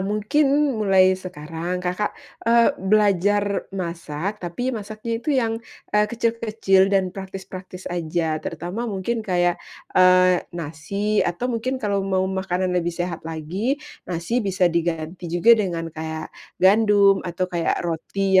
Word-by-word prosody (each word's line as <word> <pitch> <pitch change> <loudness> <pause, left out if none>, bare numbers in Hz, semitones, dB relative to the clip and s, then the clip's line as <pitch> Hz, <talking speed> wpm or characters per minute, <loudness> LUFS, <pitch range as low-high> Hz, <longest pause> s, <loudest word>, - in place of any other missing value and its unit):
mungkin 210 +9 +1 0.2
mulai 195 -4 +4
sekarang 175 -1 -5
Kakak, 180 +4 -1 0.3
eee, 235 +3 +5
belajar 205 0 +2
masak, 175 +1 -4
tapi 245 +9 -3
masaknya 220 +1 -4
itu 280 +2 0
yang, 230 -3 +1 0.4
eee, 210 0 +4
kecil-kecil 225 -5 +2
dan 190 -2 +1
praktis-praktis 190 -1 -8
aja 160 -2 -1
terutama 200 +8 -4
mungkin 215 +3 -2
kaya, 175 -4 +1 0.3
eee, 185 -1 +5 0.2
nasi 175 +7 -2
atau 240 +9 -1
mungkin 255 +3 -1
kalau 205 -5 -1
mau 190 -1 0
makanan 190 -1 -1
lebih 175 -1 -1
sehat 175 -2 -3
lagi, 175 - -2 0.3
nasi 180 +8 -1
bisa 190 -4 +1
diganti 170 +1 -2
juga 175 +8 +5
dengan 170 -7 0
kayak 160 0 -6 0.2
gandum 200 0 +5
atau 175 +1 -1
kayak 175 -2 -1
roti 190 +3 +1
190 Hz, 125 wpm, -23 LUFS, 175-210 Hz, 0.4 s, eee